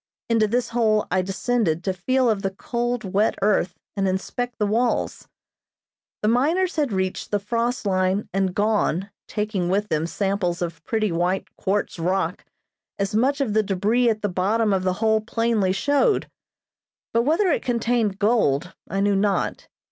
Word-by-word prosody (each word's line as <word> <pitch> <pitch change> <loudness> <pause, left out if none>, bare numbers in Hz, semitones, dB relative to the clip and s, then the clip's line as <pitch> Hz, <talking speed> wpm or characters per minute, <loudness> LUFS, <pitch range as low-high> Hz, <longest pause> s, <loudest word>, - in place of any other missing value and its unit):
Into 225 -2 +3
this 245 +3 0
hole 220 -3 +2
I 185 - +2
descended 190 -3 0
to 190 - 0
feel 255 +8 +1
of 215 -3 +1
the 195 - 0
cold, 240 +4 -3
wet 200 +3 +1
earth 200 -3 +1 0.2
and 195 -1 0
inspect 240 +6 -3
the 210 - +1
walls. 230 +4 0 1.0
The - - +2
miners 320 +11 +2
had 295 -6 0
reached 190 -1 -2
the 205 - +1
frost 230 +4 -2
line 190 +1 +1
and 190 -1 0
gone, 205 -3 +1 0.2
taking 210 -4 -2
with 205 +3 0
them 155 +1 0
samples 195 -2 -1
of 165 -2 -4
pretty 215 -3 0
white 175 +3 -1
quartz 195 -2 -1
rock, 180 +1 -1 0.5
as 200 0 -2
much 270 +6 +2
of 235 -7 0
the 220 - +4
debris 215 +5 +1
at 215 -1 -1
the - - +2
bottom 205 +4 +1
of 190 - +1
the 185 0 0
hole 220 0 +3
plainly 230 -3 +1
showed, 285 - +2 0.9
but 230 - +4
whether 325 - +2
it - - +1
contained 235 -4 0
gold 200 - +1 0.2
I 195 - -1
knew 200 0 +2
not. 200 0 0
210 Hz, 165 wpm, -23 LUFS, 190-235 Hz, 1.0 s, the